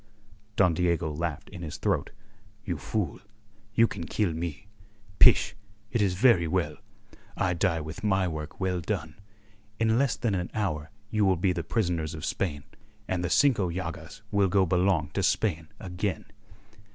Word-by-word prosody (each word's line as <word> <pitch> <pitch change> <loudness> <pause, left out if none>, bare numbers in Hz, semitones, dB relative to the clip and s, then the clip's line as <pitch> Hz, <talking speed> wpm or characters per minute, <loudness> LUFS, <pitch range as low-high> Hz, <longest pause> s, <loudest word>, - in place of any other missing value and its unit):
Don 90 -4 +4
Diego 85 -2 +1
laughed 80 0 -3
in 90 - -9
his 80 -3 -5
throat. - - 0 0.6
"You 90 -7 -2
fool! 100 +7 -2 0.6
You 115 - +6
can 90 -6 -6
kill 95 +1 0
me. 80 -2 -5 0.5
Pish! 105 - +6 0.4
It 115 - +1
is 95 -3 +2
very 100 -5 +5
well. - - -1 0.6
I 95 -2 +1
die 85 -1 +1
with 80 +5 -7
my 95 -3 +2
work 80 -2 -6
well 90 -2 0
done. 80 +1 -4 0.6
In 115 +1 +3
less 140 -3 +2
than 115 -4 -1
an 90 -2 -1
hour 80 -9 -1 0.2
you 105 -1 +2
will 95 -2 +4
be 90 +2 +2
the 85 -2 -3
prisoners 85 -6 -1
of 80 +2 -5
Spain, 75 -7 -2 0.4
and 90 -1 -1
the 90 - -1
Cinco 115 -6 +4
Llagas 85 +4 -6
will 100 -2 +3
go 95 0 +4
belong 90 -3 +2
to - - -1
Spain 85 -7 +1
again." 95 0 -3
90 Hz, 165 wpm, -28 LUFS, 80-100 Hz, 0.6 s, You